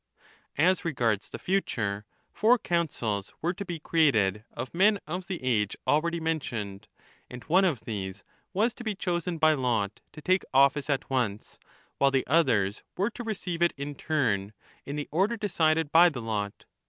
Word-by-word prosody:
1 160 +5 +4
As 185 0 +2
regards 120 - 0
the - - -6
future, 110 - -1 0.3
four 235 +4 +4
Councils 130 - -2
were 170 +3 0
to 195 - -6
be 175 -3 -5
created, 115 - +2
of 125 +2 -6
men 200 +4 +4
of 175 +3 -5
the 185 -8 -5
age 105 -6 +1
already 170 +3 +1
mentioned, 120 -12 -3 0.4
and 125 0 -9
one 185 +4 +3
of 160 - +1
these 100 -3 -5 0.3
was 220 +5 +1
to 245 - -10
be 215 -3 -2
chosen 175 -2 -2
by 155 0 +5
lot 115 -7 -1
to 155 - -11
take 185 +5 +2
office 140 +1 +4
at 140 -2 0
once, 110 -6 -2 0.4
while 140 - +5
the 135 -1 +1
others 120 -10 +2 0.2
were 200 +5 +1
to 240 - -7
receive 185 -6 -4
it 175 - +4
in 140 +1 -4
turn, 115 -10 -1 0.3
in 140 - -4
the 150 -1 -4
order 195 +9 +1
decided 165 -7 +1
by 175 +2 +7
the 140 -7 -6
lot. 105 -3 -3
150 Hz, 175 wpm, -28 LUFS, 115-175 Hz, 0.4 s, by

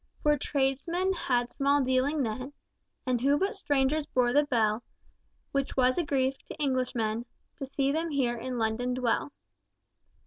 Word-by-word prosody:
Poor 295 0 +4
tradesmen 290 +7 0
had 245 -8 0
small 280 0 +2
dealing 260 +3 +1
then 255 +5 -4 0.5
And 250 -3 0
who 280 +3 +3
but 390 +6 0
strangers 290 -4 +1
bore 245 -1 +2
the 290 +2 +5
bell, 225 -4 +1 0.7
Which 275 -1 -2
was 255 +3 +3
a - - +2
grief 270 -2 0
to - - -9
Englishmen 245 -5 -1 0.3
To 275 - -5
see 275 0 0
them 325 +3 -1
here 260 -5 0
in 250 +2 -4
London 235 +2 0
dwell." 250 +2 0
265 Hz, 150 wpm, -29 LUFS, 245-285 Hz, 0.7 s, the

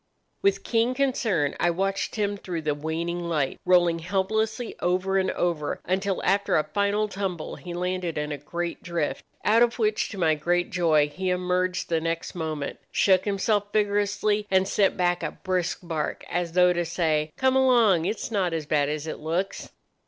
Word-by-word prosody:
"With 395 0 +2
keen 235 +2 +1
concern 230 - +1
I 175 - +3
watched 195 +3 -1
him 205 -2 0
through 175 -5 -5
the 150 -1 +1
waning 160 +4 -3
light 160 -6 -1
rolling 175 -2 +4
helplessly 215 +6 -1
over 185 +2 +1
and 190 0 0
over 165 -4 -1
until 190 +1 -1
after 200 +1 +2
a 155 - +2
final 205 +3 0
tumble 190 -5 -4
he 175 0 -7
landed 180 -2 -2
in 150 0 -2
a 145 - -4
great 170 +4 -4
drift, 170 -4 -2 0.2
out 220 +2 +5
of 240 0 +3
which, 215 -2 +1
to 205 - -8
my 165 -4 +3
great 175 +5 0
joy, 160 -5 +3
he 185 +5 -3
emerged 180 0 0
the 165 -1 +1
next 165 0 -3
moment, 155 -4 -4
shook 190 -2 +3
himself 205 0 0
vigorously, 205 0 +1
and 190 0 +3
sent 195 0 +2
back 175 -1 +1
a 155 - -3
brisk 180 -2 -1
bark 160 -3 -3
as 175 -1 -1
though 180 0 +5
to 175 0 0
say, 160 -3 0
'Come 260 0 +2
along; 235 -10 +4
it's 210 +4 -3
not 190 -5 0
so 160 -2 -2
bad 145 -1 +1
as 150 0 -3
it 160 - -5
looks. 170 +5 -3
180 Hz, 180 wpm, -26 LUFS, 165-200 Hz, 0.2 s, out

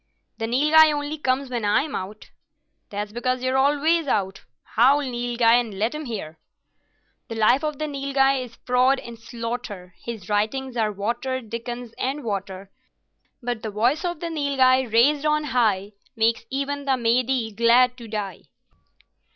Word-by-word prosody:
"The 225 - -2
Nilghai 300 +6 +5
only 295 +1 -3
comes 260 -1 -1
when 240 -3 -2
I'm 265 +9 +1
out." 205 +3 -7 0.6
"That's 205 0 -4
because 255 +2 -2
you're 255 0 0
always 295 +4 +2
out. 195 -6 -1 0.2
Howl, 265 +6 +3
Nilghai, 240 -3 +1
and 225 -5 -4
let 220 +6 0
him 305 0 -5
hear." 180 - -6 0.9
"The 225 - -6
life 230 +6 +3
of 300 -2 -2
the 310 - -2
Nilghai 275 -2 +1
is 235 -2 -12
fraud 255 +2 +3
and 235 -1 -10
slaughter, 230 -6 -6
His 220 -6 -7
writings 240 +5 -1
are 220 -3 +1
watered 235 +4 -3
Dickens 240 0 -6
and 275 +3 -2
water; 195 -2 -5 0.7
But 240 -2 -3
the 220 - -4
voice 240 - +1
of 345 -3 -3
the 340 -1 -3
Nilghai 265 -5 +2
raised 280 +6 +4
on 300 0 +2
high 215 -8 +1 0.2
Makes 225 0 +1
even 280 +1 -3
the 270 - +2
Mahdieh 240 -1 0
glad 245 +2 +4
to 235 - -9
die!" 205 -4 -5
245 Hz, 155 wpm, -23 LUFS, 220-275 Hz, 0.9 s, Nilghai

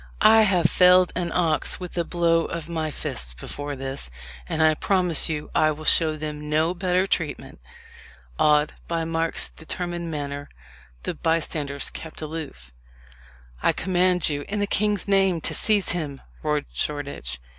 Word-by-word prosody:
"I 220 0 +8
have 180 -3 +1
felled 180 +2 +5
an 170 -1 -2
ox 160 -4 +1
with 180 -2 -7
a 170 - 0
blow 165 -1 +1
of 165 -2 -5
my 160 -2 -2
fist - - -5
before 145 - -6
this, 135 - -5 0.4
and 160 - +1
I 155 0 +5
promise 180 -1 +2
you 150 -1 -4
I 155 - +3
will 155 +1 -5
show 155 -1 +5
them 150 -1 -6
no 160 +3 +1
better 185 0 +1
treatment." 160 -6 -3 0.8
Awed 150 0 +3
by 165 -1 -2
Mark's 165 0 +1
determined 175 +1 -5
manner, 145 -2 -5 0.5
the - - -3
bystanders 155 -3 -1
kept 160 - -9
aloof. 150 - -7 0.9
"I - - +3
command 180 -1 +2
you, 145 -1 -2
in 210 - -3
the 205 - +1
king's 205 0 0
name, 195 -3 +3
to - - -2
seize 210 -3 +3
him!" 150 -6 -3 0.2
roared 150 -1 -1
Shoreditch. 140 - -3
160 Hz, 155 wpm, -24 LUFS, 150-180 Hz, 0.9 s, I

